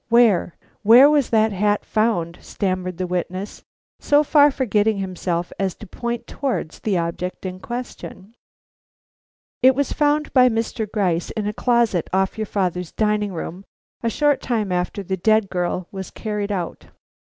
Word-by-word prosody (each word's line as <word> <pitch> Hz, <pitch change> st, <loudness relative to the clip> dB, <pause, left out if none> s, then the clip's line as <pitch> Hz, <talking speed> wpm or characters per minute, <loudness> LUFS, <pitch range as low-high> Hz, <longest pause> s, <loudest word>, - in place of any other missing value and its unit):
Where 230 Hz, -7 st, +3 dB, 0.2 s
where 245 Hz, +7 st, +8 dB
was 290 Hz, -4 st, +2 dB
that 220 Hz, -1 st, +3 dB
hat 205 Hz, +1 st, 0 dB
found?" 195 Hz, -7 st, 0 dB
stammered 185 Hz, -3 st, -3 dB
the 185 Hz, -, -2 dB
witness, 180 Hz, +2 st, -4 dB, 0.4 s
so 290 Hz, +1 st, +3 dB
far 290 Hz, -1 st, +5 dB
forgetting 220 Hz, -6 st, +1 dB
himself 180 Hz, -2 st, -3 dB
as 190 Hz, -2 st, -1 dB
to 215 Hz, -, -11 dB
point 235 Hz, +4 st, -4 dB
towards 265 Hz, -, -3 dB
the 200 Hz, -4 st, 0 dB
object 170 Hz, +3 st, -4 dB
in 185 Hz, 0 st, -5 dB
question. 240 Hz, -3 st, -7 dB, 1.3 s
"It 260 Hz, +1 st, +6 dB
was 280 Hz, 0 st, 0 dB
found 300 Hz, 0 st, +1 dB
by 255 Hz, -1 st, +6 dB
Mr. 225 Hz, -2 st, -2 dB
Gryce 180 Hz, -6 st, 0 dB
in 215 Hz, -2 st, -4 dB
a 210 Hz, -, -2 dB
closet 235 Hz, -7 st, +1 dB
off 190 Hz, 0 st, +1 dB
your 215 Hz, -1 st, -3 dB
father's 180 Hz, -4 st, -2 dB
dining 210 Hz, -1 st, 0 dB
room, 180 Hz, +2 st, -6 dB, 0.4 s
a 230 Hz, -, 0 dB
short 290 Hz, +4 st, +1 dB
time 220 Hz, -6 st, -1 dB
after 180 Hz, +3 st, -2 dB
the 190 Hz, 0 st, -3 dB
dead 215 Hz, +1 st, +2 dB
girl 180 Hz, 0 st, -2 dB
was 190 Hz, -1 st, -6 dB
carried 210 Hz, -2 st, -4 dB
out." 180 Hz, -4 st, -4 dB
210 Hz, 155 wpm, -21 LUFS, 185-235 Hz, 1.3 s, where